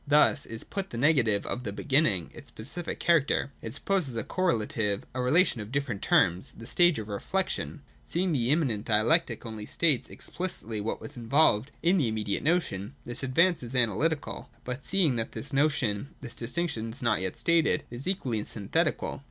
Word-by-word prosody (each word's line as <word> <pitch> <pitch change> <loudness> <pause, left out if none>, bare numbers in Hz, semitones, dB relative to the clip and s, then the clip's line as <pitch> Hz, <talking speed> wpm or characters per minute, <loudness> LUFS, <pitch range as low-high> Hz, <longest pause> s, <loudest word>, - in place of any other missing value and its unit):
Thus 145 0 +4
is 115 0 -4
put 195 -1 -4
the 115 - -6
negative 125 -7 +3
of 125 - -3
the 100 - -3
beginning, 130 - +2
its - - -11
specific 150 +10 -5
character: 150 -4 +2
it 115 - -6
supposes 180 -11 -1
a 115 - -1
correlative, 110 - 0
a 130 - -2
relation 130 - +3
of 105 +2 -8
different 135 -7 -2
terms, 90 +1 +2
— - - -18
the 115 - -9
stage 175 +6 +3
of 110 -2 -5
Reflection. 150 - -2 0.2
Seeing 170 +9 -1
that 145 - +1
the 120 +1 0
immanent 135 -9 +1
dialectic 115 +3 +2
only 110 -2 -6
states 155 -7 +1
ex - - -8
plicitly 115 - -3
what 110 - -3
was 110 - -7
involved 120 0 +3
in 175 +3 +4
the 145 -9 +2
immediate 110 -2 -1
notion, 140 - 0
this 120 - -3
advance 165 +7 +3
is 120 +1 -6
Analytical; 130 - 0
but 125 +2 -5
seeing 170 -10 +2
that 115 - -1
in - - -26
this 140 +1 -5
notion 135 -3 +1
this 120 -3 -8
distinction 120 -2 -3
was 125 +4 -8
not 105 -5 +2
yet 95 -1 -3
stated, 170 -2 +2
— - - -32
it - - -6
is 130 +7 -5
equally 130 - -1
Synthetical. 145 - -1
125 Hz, 195 wpm, -28 LUFS, 110-160 Hz, 0.2 s, Thus